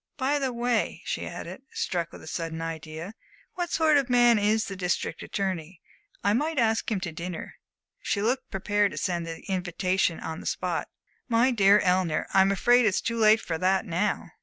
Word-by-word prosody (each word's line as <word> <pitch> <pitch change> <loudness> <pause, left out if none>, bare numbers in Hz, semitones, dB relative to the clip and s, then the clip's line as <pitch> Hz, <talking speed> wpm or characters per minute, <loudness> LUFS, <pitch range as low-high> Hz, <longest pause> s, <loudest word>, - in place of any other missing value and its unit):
By 285 +1 +1
the 265 -2 -1
way," 240 -1 -1
she - - -3
added, - - -7
struck 170 -2 -2
with - - -12
a - - -11
sudden 165 0 -4
idea, 165 +3 -6 0.4
"what 350 -1 -3
sort 315 -2 +4
of 275 -2 0
man 240 -2 +5
is 215 +1 +2
the 195 - -6
District 180 -3 -2
Attorney? 185 -4 -3 0.4
I 205 - +3
might 300 +7 0
ask 225 -2 +2
him 215 -4 0
to 175 -3 -3
dinner." 170 +1 -5
And - - -12 0.5
she 200 - -1
looked 255 +5 -1
prepared 205 +1 0
to - - -8
send 170 -2 -2
the 165 0 -6
invitation 185 -1 0
on 160 +1 -5
the - - -7
spot. - - -2 0.4
"My 235 +3 +4
dear 200 -3 +5
Eleanor, 180 -4 +1
I'm 195 0 +5
afraid 240 +4 +4
it's 195 - +2
too 230 0 -2
late 220 0 +5
for 160 -2 -3
that 190 +2 +2
now. 180 +4 -1
195 Hz, 190 wpm, -27 LUFS, 175-235 Hz, 0.5 s, man